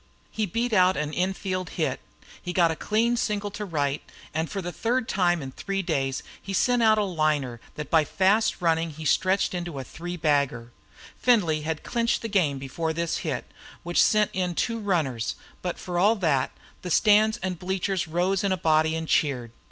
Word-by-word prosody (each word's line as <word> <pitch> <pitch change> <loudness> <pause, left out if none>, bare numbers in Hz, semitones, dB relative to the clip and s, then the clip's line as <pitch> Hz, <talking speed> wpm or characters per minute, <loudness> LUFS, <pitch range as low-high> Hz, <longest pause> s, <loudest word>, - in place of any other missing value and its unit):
He 215 -1 -1
beat 230 +5 -1
out 185 -1 +4
an 150 0 -2
in 185 +3 0
field 185 -3 -3
hit; - - 0 0.4
he 180 - -4
got 170 -3 +4
a - - -2
clean 225 +7 +1
single 210 -3 -1
into 210 +1 -5
right 145 -6 -1
field; - - -20
and 160 +1 -1
for 200 - -4
the 175 -2 -4
third 235 +5 -1
time 175 -4 +1
in 135 - -6
three 195 +7 -3
days 135 -6 -1 0.2
he 195 - -6
sent 245 +4 +2
out 220 -1 +5
a 210 - +2
liner 155 - 0
that 150 -2 -6
by 160 -2 +5
fast 195 +7 +2
running 165 -1 +2
he 155 0 -9
stretched 185 +6 +2
into 175 -4 -4
a 135 - -4
three 175 +6 -7
bagger. 140 -7 0 0.5
Findlay 180 -11 +3
had 160 0 -3
clinched 235 -1 0
the 225 - -3
game 170 -9 +2
before 160 +5 -3
this 170 0 -1
hit, 145 -6 -3 0.4
which 175 0 +2
sent 215 -1 +3
in 180 -2 -1
two 230 +3 -1
runners, 155 - -1 0.3
but 180 -1 -3
for 175 -1 -3
all 210 +5 +5
that, 155 - +1 0.3
the 180 - -5
stands 215 +4 +4
and 185 -3 -2
bleachers 190 0 -1
rose 180 +4 0
in 200 - +1
a 185 - +1
body 160 -1 +2
and 160 0 -3
cheered. 125 -8 +1
175 Hz, 200 wpm, -26 LUFS, 155-200 Hz, 0.5 s, out